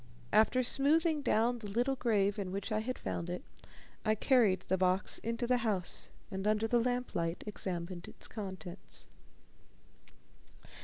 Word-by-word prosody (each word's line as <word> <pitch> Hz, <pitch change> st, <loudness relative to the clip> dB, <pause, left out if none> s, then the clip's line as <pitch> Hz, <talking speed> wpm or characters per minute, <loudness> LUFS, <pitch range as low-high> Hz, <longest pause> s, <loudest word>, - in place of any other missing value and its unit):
After 220 Hz, +4 st, +5 dB
smoothing 305 Hz, +5 st, +3 dB
down 240 Hz, -1 st, +2 dB
the 215 Hz, -, -6 dB
little 245 Hz, +6 st, +1 dB
grave 210 Hz, -5 st, +2 dB
in 190 Hz, -2 st, -3 dB
which 200 Hz, +4 st, -3 dB
I 215 Hz, -, +2 dB
had 255 Hz, +4 st, -3 dB
found 170 Hz, -, -3 dB
it, 180 Hz, -, -4 dB, 0.6 s
I 215 Hz, -1 st, +3 dB
carried 220 Hz, -4 st, +4 dB
the 190 Hz, -, 0 dB
box 185 Hz, +2 st, +1 dB
into 230 Hz, +2 st, -2 dB
the 250 Hz, +1 st, +3 dB
house, 210 Hz, -7 st, -2 dB, 0.2 s
and 195 Hz, +1 st, -2 dB
under 215 Hz, +1 st, +2 dB
the 240 Hz, +1 st, +3 dB
lamplight 235 Hz, -9 st, -1 dB
examined 180 Hz, -3 st, -4 dB
its -, -, -8 dB
contents. 190 Hz, -5 st, -6 dB
215 Hz, 145 wpm, -33 LUFS, 190-245 Hz, 0.6 s, After